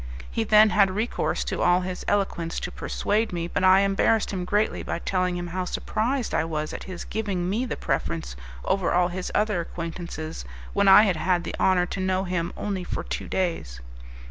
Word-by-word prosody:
He 225 - 0
then 215 0 +6
had 200 -2 +4
recourse 215 +5 -1
to - - -3
all 180 +1 +4
his 185 0 -5
eloquence 190 -5 0
to 180 - -4
persuade 215 +4 -1
me, 170 -1 -3
but 185 - -2
I 190 +1 +7
embarrassed 200 +2 +2
him 185 -2 -3
greatly 210 +3 0
by - - -3
telling 180 0 -1
him 175 - -4
how 185 0 -1
surprised 240 +7 -1
I - - +2
was 155 -1 -3
at - - -6
his 185 -2 -6
giving 195 -5 -2
me 220 +7 0
the - - -4
preference - - -2 0.3
over 195 -2 +1
all 175 0 +3
his 180 +1 -4
other 210 -4 +1
acquaintances, 165 - -6 0.3
when 200 0 +2
I 195 +2 +9
had 195 -6 +1
had 180 0 +1
the - - -5
honour 185 -2 +3
to 190 - -5
know 185 0 0
him 180 -2 -2
only 195 -3 -3
for - - -4
two - - -5
days. 165 - -2
185 Hz, 195 wpm, -25 LUFS, 175-205 Hz, 0.3 s, I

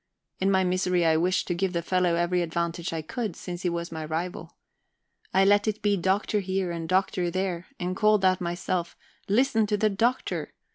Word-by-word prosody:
In 195 - +2
my 190 -1 +3
misery 180 -1 +1
I 160 -1 +4
wished 180 +4 +1
to 175 - 0
give 185 +1 -1
the 170 -1 -1
fellow 180 -1 +2
every 175 +1 +1
advantage 170 0 -2
I 160 -1 -3
could, 220 +2 -4
since 175 -1 -6
he 180 - 0
was 170 0 -4
my 160 -1 -5
rival. 165 +4 -4 0.8
I 190 +1 +4
let 205 +2 +4
it 215 0 -2
be 205 -1 +3
"Doctor" 195 +3 +1
here 190 -2 -1
and 165 -1 -5
"Doctor" 185 -1 +1
there, 185 -1 -2
and 180 +1 -2
called 210 -1 +3
out 185 0 +3
myself: 175 0 -2 0.3
"Listen 225 0 +3
to 210 0 +1
the 215 +1 +2
Doctor!" 235 +6 -1
185 Hz, 195 wpm, -26 LUFS, 170-195 Hz, 0.8 s, I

